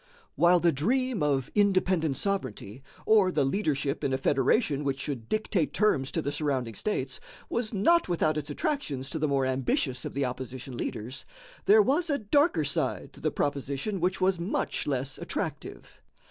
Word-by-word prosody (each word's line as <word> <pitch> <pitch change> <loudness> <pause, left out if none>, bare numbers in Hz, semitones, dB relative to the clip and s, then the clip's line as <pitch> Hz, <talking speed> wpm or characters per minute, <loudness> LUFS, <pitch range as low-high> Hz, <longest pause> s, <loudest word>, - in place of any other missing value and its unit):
While 175 +1 +5
the 170 0 +3
dream 240 - 0
of 140 -3 0
independent 185 -7 +2
sovereignty, 130 - -3 0.2
or 205 -4 +5
the 145 -5 +1
leadership 145 -3 -1
in 135 - 0
a - - +2
federation 140 - +1
which 135 -1 -1
should 130 -6 -5
dictate 215 -6 0
terms 145 -11 +2
to 165 - -1
the 145 - -1
surrounding 140 -6 -1
states, 130 - -2 0.3
was 235 -2 -1
not 245 - +3
without 155 -3 +1
its 150 -1 -3
attractions 145 - -2
to 160 - -3
the 155 - +1
more 135 -2 +1
ambitious 130 0 -1
of - - -6
the 140 -1 +1
opposition 130 +1 -6
leaders, 120 +2 -5 0.4
there 420 +1 +7
was 325 +3 +1
a 285 - +2
darker 285 - +2
side - - -1
to - - -14
the - - 0
proposition 145 +7 -2
which 185 +2 0
was 185 -1 +2
much 170 +3 -2
less 135 -1 -2
attractive. - - -6
150 Hz, 170 wpm, -28 LUFS, 135-200 Hz, 0.4 s, there